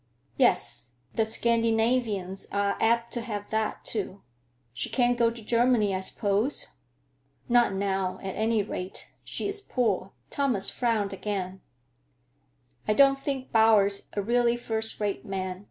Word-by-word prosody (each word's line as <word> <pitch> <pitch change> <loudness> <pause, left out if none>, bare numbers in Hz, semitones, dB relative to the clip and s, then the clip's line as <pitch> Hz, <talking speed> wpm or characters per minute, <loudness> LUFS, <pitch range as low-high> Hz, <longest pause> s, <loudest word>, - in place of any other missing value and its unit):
"Yes; 120 - +2 0.2
the 225 - +2
Scandinavians 225 -3 +1
are 200 0 +1
apt 235 +1 +2
to 240 - -1
have 210 -3 -5
that, 220 -1 -1
too. 200 -2 -3 0.5
She - - -2
can't 245 -1 +2
go 235 -1 +3
to 230 -1 -9
Germany, 230 -2 +3
I 185 - 0
suppose?" 205 +6 -1 0.8
"Not 240 -4 +4
now, 190 -1 -1
at 190 -1 -3
any 220 -1 +1
rate. 185 -2 -5
She - - -3
is 405 0 -2
poor." 215 - -1 0.2
Thomas 250 -9 +1
frowned 220 -5 0
again 190 -2 -4 1.3
"I - - +3
don't 275 +1 +5
think 275 -2 -4
Bowers 215 -3 +4
a 205 - -1
really 240 +2 +2
first 220 -2 -3
rate 205 -2 -2
man. 190 -3 -4
220 Hz, 140 wpm, -27 LUFS, 200-235 Hz, 1.3 s, don't